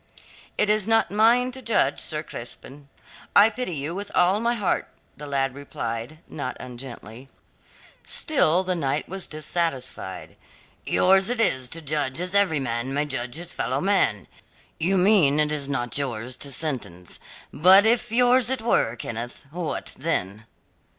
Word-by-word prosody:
"It - - +2
is 210 -1 +1
not 225 -4 +3
mine 235 +4 +4
to 260 +1 -9
judge, 220 - +1
Sir 155 0 -3
Crispin. 140 +2 -10 0.5
I 210 +2 +7
pity 230 -6 -4
you 145 +3 -4
with 200 +2 -6
all 180 +3 +4
my 235 +1 +1
heart," 205 -5 -1 0.3
the 150 - -9
lad 135 -2 0
replied, 120 -1 -5
not 135 -4 -5
ungently. 125 -1 -10 0.8
Still 185 - +2
the 185 0 0
knight 145 -4 -1
was 190 +1 -3
dissatisfied. 150 - -2 0.5
"Yours 190 +2 +4
it 245 -1 -1
is 130 - +1
to 165 +3 -4
judge 145 -1 -1
as 180 +1 -3
every 195 -7 +3
man 125 +1 -3
may 145 +1 +1
judge 125 -3 -4
his 175 +1 -4
fellowman. 130 - 0 0.5
You 185 +4 +2
mean 180 -7 +4
it 150 0 +2
is 145 -2 -3
not 120 -3 -2
yours 125 -2 -4
to 140 - -4
sentence. 125 - -4 0.3
But 190 +6 +7
if 230 0 +2
yours 245 +1 +4
it 260 -4 -1
were, 120 - +2
Kenneth, 120 +3 -6
what 170 -1 -4
then?" 110 - -2
155 Hz, 150 wpm, -24 LUFS, 130-200 Hz, 0.8 s, I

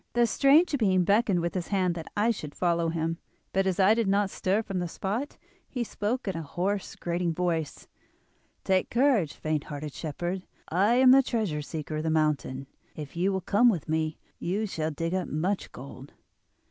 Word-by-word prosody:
The 240 0 +4
strange 285 +7 +4
being 190 -5 +3
beckoned 200 -1 +3
with 170 0 -2
his 180 -3 -3
hand 185 -3 +1
that 165 -2 -8
I 220 +3 +3
should 150 -9 -6
follow 170 -2 +1
him; 165 +1 -2 0.3
but 195 0 +2
as 190 -1 0
I 195 +3 +6
did 225 -2 0
not 200 0 +2
stir 200 +4 0
from 195 -3 -3
the 175 - -2
spot 210 - -3 0.3
he 250 -3 -2
spoke 225 +2 -3
in 190 - -1
a 165 - -3
hoarse, 185 +6 -2
grating 170 -1 -2
voice: 165 -3 -2 0.8
'Take 190 -1 +1
courage, 240 - +2
faint 155 -2 -2
hearted 145 0 -6
shepherd. 175 +4 -4 0.2
I 200 +8 +3
am 255 0 +7
the 270 +1 +8
Treasure 215 - -1
Seeker 155 0 -5
of 155 - -2
the 160 - 0
mountain. 150 -4 0 0.3
If 150 -1 -8
you 180 +3 +1
will 190 -1 -1
come 210 +6 +4
with 180 -10 -1
me 155 0 -1 0.2
you 200 +5 -1
shall 160 -6 -2
dig 165 +3 -3
up 185 -2 -1
much 180 +6 -2
gold. 135 +1 -11
180 Hz, 190 wpm, -28 LUFS, 160-205 Hz, 0.8 s, the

